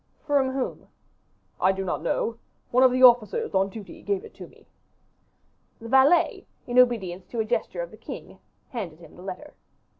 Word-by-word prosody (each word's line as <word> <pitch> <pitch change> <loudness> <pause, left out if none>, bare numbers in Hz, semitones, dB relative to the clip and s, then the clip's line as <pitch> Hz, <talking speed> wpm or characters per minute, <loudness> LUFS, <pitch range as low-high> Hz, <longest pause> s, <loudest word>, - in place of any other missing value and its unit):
"From 285 -3 +2
whom?" 260 -1 -4 0.7
"I 185 - +4
do 195 0 -4
not 175 - -2
know. 225 +7 -1 0.3
One 250 - +4
of 260 - +6
the 255 +1 +1
officers 240 -5 +5
on 195 0 +2
duty 205 0 -10
gave 405 +1 -2
it - - -13
to - - -10
me." - - -22 1.1
The 230 -1 -9
valet, 270 +7 +4 0.2
in 245 0 +2
obedience 195 -8 +2
to 235 - -5
a 220 - +1
gesture 245 - -2
of - - -9
the - - -13
king, - - -9 0.3
handed 195 - -6
him 170 - -16
the - - -13
letter. 190 +11 -8
235 Hz, 180 wpm, -25 LUFS, 195-265 Hz, 1.1 s, of